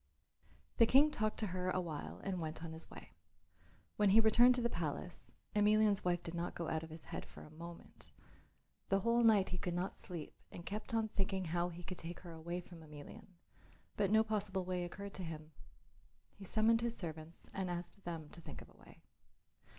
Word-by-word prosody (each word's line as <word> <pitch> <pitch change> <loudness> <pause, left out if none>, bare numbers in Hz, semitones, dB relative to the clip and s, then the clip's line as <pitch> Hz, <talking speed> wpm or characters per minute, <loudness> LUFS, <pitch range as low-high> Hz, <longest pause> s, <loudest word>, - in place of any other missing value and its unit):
The 230 - +7
King 285 +5 +7
talked 215 -4 0
to 215 - +1
her 185 0 0
a 185 - +1
while 160 -5 -5
and 185 -3 -1
went 160 0 -4
on 165 -1 -5
his 160 - -1
way. - - -11 0.9
When 210 -1 +5
he 210 +4 +8
returned 240 +3 +7
to 250 - 0
the - - +4
palace 170 -3 -3 0.2
Emelian's 210 -1 +5
wife 175 -1 +1
did 165 - -5
not 170 0 -2
go 170 - -2
out 160 - 0
of 160 - -8
his 160 0 -9
head - - -2
for - - -12
a 150 - -13
moment. 170 +2 -10 0.8
The 195 0 +3
whole 235 +3 +4
night 215 -4 +6
he 180 - -2
could 175 -3 -2
not 180 +2 -1
sleep 170 -5 -7 0.2
and 170 - -8
kept 210 +3 -3
on 220 -1 +2
thinking 190 -2 0
how 175 +2 0
he 175 0 -8
could 185 0 -6
take 170 +1 -6
her 175 - -9
away 170 +2 -4
from 175 -1 -12
Emelian, 155 +8 -10 0.7
but 200 -2 +2
no 220 +1 +6
possible 205 -4 -1
way 180 -1 -1
occurred 200 +3 -6
to 190 - -5
him. 155 -2 -6 0.8
He 200 - -11
summoned 225 +3 +4
his 235 0 -1
servants 160 -2 -7
and 190 -1 -2
asked 175 +3 -5
them 165 -3 -4
to 170 - -9
think - - -8
of - - -18
a - - -21
way. - - -17
180 Hz, 205 wpm, -37 LUFS, 170-210 Hz, 0.9 s, he